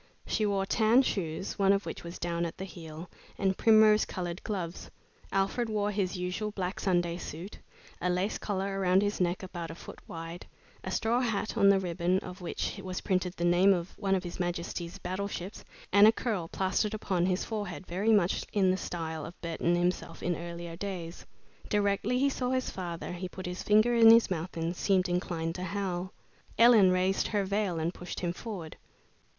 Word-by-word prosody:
She 215 Hz, -, 0 dB
wore 195 Hz, -1 st, 0 dB
tan 225 Hz, +5 st, +4 dB
shoes, 185 Hz, -4 st, -3 dB
one 195 Hz, -1 st, +5 dB
of 200 Hz, 0 st, +1 dB
which -, -, -6 dB
was 170 Hz, +1 st, -7 dB
down 170 Hz, 0 st, -2 dB
at 170 Hz, -, -4 dB
the 190 Hz, -, -5 dB
heel, 165 Hz, -1 st, -9 dB, 0.3 s
and 190 Hz, -1 st, +1 dB
primrose 215 Hz, -1 st, +6 dB
colored 175 Hz, -2 st, -5 dB
gloves. 185 Hz, -5 st, -4 dB, 0.4 s
Alfred 195 Hz, +5 st, 0 dB
wore 210 Hz, -1 st, 0 dB
his 195 Hz, -2 st, -1 dB
usual 180 Hz, +4 st, -2 dB
black 190 Hz, -2 st, -4 dB
Sunday 175 Hz, -3 st, +1 dB
suit, 175 Hz, +3 st, -8 dB, 0.4 s
a 180 Hz, -, +1 dB
lace 180 Hz, +4 st, 0 dB
collar 195 Hz, -1 st, -2 dB
around 190 Hz, +1 st, +4 dB
his 205 Hz, -1 st, -1 dB
neck 180 Hz, +1 st, 0 dB
about 175 Hz, -3 st, -6 dB
a -, -, -7 dB
foot -, -, -11 dB
wide, 165 Hz, +1 st, -7 dB, 0.4 s
a -, -, -4 dB
straw 230 Hz, +2 st, +1 dB
hat 220 Hz, -3 st, -1 dB
on 200 Hz, -3 st, +5 dB
the 195 Hz, -1 st, +5 dB
ribbon 180 Hz, 0 st, 0 dB
of 180 Hz, +1 st, -9 dB
which 180 Hz, +3 st, -3 dB
was 185 Hz, -1 st, -4 dB
printed 185 Hz, -1 st, 0 dB
the 175 Hz, -, -2 dB
name 180 Hz, +3 st, +5 dB
of 175 Hz, 0 st, -5 dB
one 195 Hz, -2 st, +1 dB
of 185 Hz, -, -1 dB
His 175 Hz, 0 st, -7 dB
Majesty's 175 Hz, -1 st, -3 dB
battleships, 190 Hz, +1 st, -5 dB, 0.3 s
and 200 Hz, +1 st, +8 dB
a -, -, +8 dB
curl 215 Hz, -7 st, -2 dB
plastered 195 Hz, +4 st, 0 dB
upon 185 Hz, -4 st, 0 dB
his 185 Hz, 0 st, 0 dB
forehead 200 Hz, -7 st, -4 dB
very 195 Hz, +6 st, 0 dB
much 195 Hz, -5 st, +3 dB
in 190 Hz, -3 st, +3 dB
the 185 Hz, -, 0 dB
style 160 Hz, -4 st, -4 dB
of 170 Hz, -, -9 dB
Burton 170 Hz, +1 st, 0 dB
himself 175 Hz, -1 st, -1 dB
in 175 Hz, 0 st, 0 dB
earlier 170 Hz, 0 st, -6 dB
days. 175 Hz, -2 st, -6 dB, 0.4 s
Directly 205 Hz, +3 st, +1 dB
he 275 Hz, +2 st, +3 dB
saw 250 Hz, -2 st, -2 dB
his 255 Hz, 0 st, 0 dB
father, 175 Hz, -3 st, -5 dB
he 180 Hz, +1 st, -5 dB
put 185 Hz, +1 st, -8 dB
his 180 Hz, 0 st, -4 dB
finger 215 Hz, +3 st, +4 dB
in 230 Hz, -1 st, +8 dB
his 230 Hz, -3 st, +7 dB
mouth 170 Hz, 0 st, -3 dB
and 165 Hz, +2 st, -2 dB
seemed 190 Hz, 0 st, +2 dB
inclined 175 Hz, -2 st, -2 dB
to 180 Hz, +1 st, -5 dB
howl. 185 Hz, -1 st, -3 dB, 0.5 s
Ellen 230 Hz, -5 st, +7 dB
raised 185 Hz, +1 st, +2 dB
her 205 Hz, -2 st, 0 dB
veil 200 Hz, -3 st, 0 dB
and 165 Hz, +2 st, -1 dB
pushed 180 Hz, -, -7 dB
him 175 Hz, -1 st, -1 dB
forward. 180 Hz, -6 st, -7 dB
185 Hz, 190 wpm, -30 LUFS, 175-205 Hz, 0.5 s, and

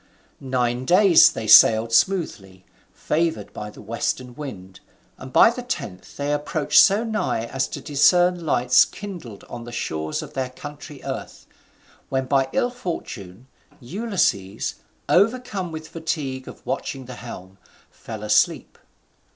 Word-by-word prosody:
Nine 125 Hz, -2 st, -1 dB
days 175 Hz, -1 st, +6 dB
they 110 Hz, -, -6 dB
sailed 110 Hz, +1 st, +7 dB
smoothly, 105 Hz, -, 0 dB, 0.3 s
favoured 155 Hz, -10 st, -2 dB
by 105 Hz, -, -6 dB
the 105 Hz, -, -13 dB
western 120 Hz, +3 st, -3 dB
wind, 95 Hz, -10 st, -9 dB, 0.4 s
and 130 Hz, 0 st, -9 dB
by 225 Hz, -, +6 dB
the 250 Hz, -, -6 dB
tenth 105 Hz, -, -6 dB
they 145 Hz, +1 st, -1 dB
approached 150 Hz, +1 st, +2 dB
so 205 Hz, +3 st, +5 dB
nigh 215 Hz, -, -2 dB
as 130 Hz, +2 st, -2 dB
to -, -, -7 dB
discern 175 Hz, +4 st, +3 dB
lights 125 Hz, -5 st, +4 dB
kindled 175 Hz, -, -9 dB
on 120 Hz, -1 st, -9 dB
the 120 Hz, -, -9 dB
shores 80 Hz, -9 st, -3 dB
of -, -, -11 dB
their 130 Hz, -1 st, -2 dB
country 145 Hz, +2 st, -10 dB
earth: -, -, -6 dB, 0.6 s
when, 130 Hz, 0 st, -1 dB
by 135 Hz, 0 st, +1 dB
ill 245 Hz, -, 0 dB
fortune, 125 Hz, -, -7 dB, 0.3 s
Ulysses, 130 Hz, -, -1 dB, 0.3 s
overcome 205 Hz, -3 st, +1 dB
with 160 Hz, 0 st, -7 dB
fatigue 155 Hz, -6 st, -4 dB
of -, -, -12 dB
watching 135 Hz, -2 st, -4 dB
the 125 Hz, -, -9 dB
helm, 95 Hz, -5 st, -10 dB, 0.3 s
fell 110 Hz, -2 st, -9 dB
asleep. 105 Hz, 0 st, +1 dB
130 Hz, 135 wpm, -23 LUFS, 115-170 Hz, 0.6 s, sailed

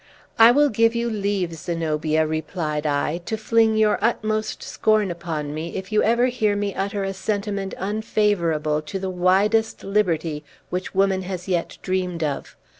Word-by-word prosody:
"I 225 Hz, +1 st, +9 dB
will 290 Hz, +4 st, +4 dB
give 230 Hz, +1 st, +2 dB
you 235 Hz, 0 st, -1 dB
leave, 200 Hz, -4 st, -1 dB
Zenobia," 160 Hz, -1 st, -1 dB
replied 155 Hz, -1 st, -2 dB
I, 150 Hz, +3 st, 0 dB
"to 220 Hz, -, -2 dB
fling 220 Hz, 0 st, +2 dB
your 215 Hz, -1 st, +3 dB
utmost 215 Hz, -1 st, -1 dB
scorn 215 Hz, -3 st, +1 dB
upon 160 Hz, -4 st, -4 dB
me, 160 Hz, +2 st, -5 dB
if 190 Hz, +2 st, -6 dB
you 215 Hz, -, +3 dB
ever 235 Hz, +2 st, +3 dB
hear 220 Hz, -5 st, +1 dB
me 205 Hz, -1 st, -2 dB
utter 200 Hz, +1 st, -2 dB
a 195 Hz, 0 st, -2 dB
sentiment 200 Hz, 0 st, -3 dB
unfavorable 190 Hz, -7 st, 0 dB
to 155 Hz, +6 st, -5 dB
the 190 Hz, 0 st, -3 dB
widest 195 Hz, +5 st, +2 dB
liberty 170 Hz, -7 st, 0 dB, 0.3 s
which 180 Hz, +1 st, -4 dB
woman 195 Hz, -1 st, +2 dB
has 185 Hz, -1 st, -6 dB
yet 175 Hz, -3 st, -1 dB
dreamed 180 Hz, -3 st, -1 dB
of. 145 Hz, -3 st, -4 dB
195 Hz, 160 wpm, -23 LUFS, 165-215 Hz, 0.3 s, I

